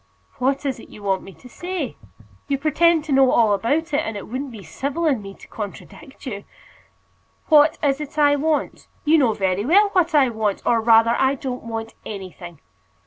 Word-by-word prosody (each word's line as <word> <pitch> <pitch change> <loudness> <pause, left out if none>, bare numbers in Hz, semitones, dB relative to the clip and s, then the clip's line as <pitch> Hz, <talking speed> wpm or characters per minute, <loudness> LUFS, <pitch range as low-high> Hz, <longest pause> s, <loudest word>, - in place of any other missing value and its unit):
"What 270 +3 0
is 265 -3 -2
it - - -13
you 210 - -13
want 195 -2 0
me 195 - -11
to 255 - -15
say? 350 +2 -5 0.5
You 280 - 0
pretend 315 +3 +2
to 305 - -6
know 270 -1 +5
all 220 -3 +4
about 290 - -1
it, 290 - +3
and 220 -8 -3
it 200 - -8
wouldn't 265 +4 -4
be 220 -5 -10
civil 285 - -3
in 270 -8 +1
me 195 -1 -10
to - - -16
contradict 245 +8 -9
you." 200 -6 -5 1.1
"What 300 0 +5
is 280 0 +1
it 300 +1 -8
I 290 -1 +4
want? 305 +1 -2 0.2
You 315 +2 +5
know 245 -6 +3
very 190 -1 -1
well 400 - +4
what 355 -4 +1
I 275 -4 +5
want; 220 -3 -2
or 235 -1 +2
rather, 230 0 +5
I 265 +1 +2
don't 255 -2 -5
want 225 -1 -5
anything. 185 -5 -9
265 Hz, 200 wpm, -22 LUFS, 220-300 Hz, 1.1 s, know